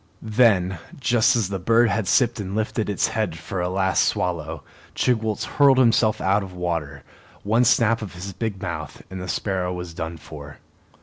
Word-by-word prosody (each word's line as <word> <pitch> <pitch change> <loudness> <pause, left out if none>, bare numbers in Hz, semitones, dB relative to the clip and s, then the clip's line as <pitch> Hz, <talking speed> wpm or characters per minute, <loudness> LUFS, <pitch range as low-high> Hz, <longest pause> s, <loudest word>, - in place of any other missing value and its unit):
Then, 95 -7 +3 0.2
just 125 -1 +3
as 110 -6 0
the 95 -1 -3
bird 115 +5 +3
had 110 -2 -1
sipped 120 +1 +2
and 100 -1 -4
lifted 110 0 -1
its 100 - +1
head 110 -7 -2
for 90 +3 -5
a 90 - -1
last 95 0 +2
swallow, 80 -4 -2 0.3
Chigwooltz 110 -4 0
hurled 140 -2 +4
himself 115 -3 +3
out 100 +2 +2
of 95 -2 -8
water. 80 -6 -3 0.4
One 115 +4 +2
snap 115 0 +3
of 105 -5 -7
his 95 +2 -7
big 110 -1 -4
mouth, 80 -5 -6
and 95 -1 -6
the 90 - -6
sparrow 90 -1 -2
was 90 -2 -6
done 80 0 -5
for. 75 -2 -11
95 Hz, 180 wpm, -23 LUFS, 90-115 Hz, 0.4 s, hurled